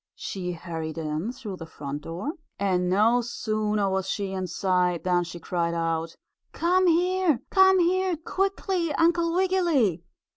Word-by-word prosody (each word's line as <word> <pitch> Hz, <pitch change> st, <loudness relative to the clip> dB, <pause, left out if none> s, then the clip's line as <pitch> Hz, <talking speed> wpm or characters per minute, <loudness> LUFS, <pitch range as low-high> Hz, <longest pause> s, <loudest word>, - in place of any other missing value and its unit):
She 180 Hz, -2 st, -4 dB
hurried 165 Hz, -2 st, -6 dB
in 160 Hz, +6 st, -2 dB
through 215 Hz, -7 st, -7 dB
the 165 Hz, -, -8 dB
front 145 Hz, -2 st, -6 dB
door 180 Hz, -, -4 dB, 0.2 s
and 180 Hz, -2 st, +1 dB
no 220 Hz, +6 st, +4 dB
sooner 215 Hz, -3 st, -1 dB
was 190 Hz, -1 st, -1 dB
she 200 Hz, -2 st, -2 dB
inside 180 Hz, -1 st, 0 dB
than 180 Hz, -1 st, +2 dB
she 175 Hz, 0 st, -8 dB
cried 170 Hz, -1 st, -1 dB
out: 165 Hz, 0 st, -2 dB, 0.4 s
"Come 365 Hz, +2 st, +2 dB
here! 355 Hz, -4 st, +2 dB
Come 380 Hz, 0 st, +6 dB
here, 365 Hz, 0 st, +2 dB
quickly, 375 Hz, 0 st, -1 dB
Uncle 335 Hz, 0 st, +2 dB
Wiggily! 340 Hz, -, +2 dB
200 Hz, 140 wpm, -26 LUFS, -, 0.4 s, Come